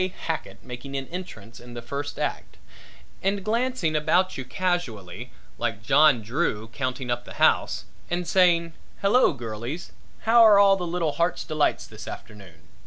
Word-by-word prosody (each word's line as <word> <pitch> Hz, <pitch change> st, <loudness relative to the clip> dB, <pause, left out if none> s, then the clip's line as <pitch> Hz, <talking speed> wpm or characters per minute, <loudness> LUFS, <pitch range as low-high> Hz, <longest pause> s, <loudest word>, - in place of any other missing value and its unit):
Hackett 160 Hz, -1 st, -4 dB
making 130 Hz, +2 st, -6 dB
an 135 Hz, -, -4 dB
entrance 120 Hz, -, -8 dB
in 120 Hz, 0 st, -12 dB
the 120 Hz, -, -5 dB
first 140 Hz, +4 st, -5 dB
act -, -, -4 dB, 0.6 s
and 195 Hz, 0 st, 0 dB
glancing 230 Hz, -7 st, 0 dB
about 180 Hz, +5 st, +2 dB
you 130 Hz, -, -4 dB
casually 125 Hz, -, -3 dB, 0.3 s
like 105 Hz, -, -2 dB
John 140 Hz, -2 st, +5 dB
Drew 110 Hz, -2 st, -1 dB
counting 130 Hz, 0 st, -3 dB
up 120 Hz, 0 st, -1 dB
the -, -, -11 dB
house -, -, +2 dB, 0.2 s
and 175 Hz, 0 st, -2 dB
saying 170 Hz, -2 st, +3 dB, 0.3 s
"Hello 225 Hz, +6 st, +5 dB
girlies, 120 Hz, +5 st, -6 dB, 0.3 s
how're 225 Hz, -2 st, +7 dB
all 200 Hz, -1 st, +6 dB
the 180 Hz, -2 st, -4 dB
little 170 Hz, -2 st, 0 dB
Heart's 170 Hz, +3 st, 0 dB
Delights 155 Hz, -2 st, 0 dB
this -, -, -11 dB
afternoon?" 95 Hz, -7 st, -11 dB
150 Hz, 150 wpm, -25 LUFS, 120-180 Hz, 0.6 s, how're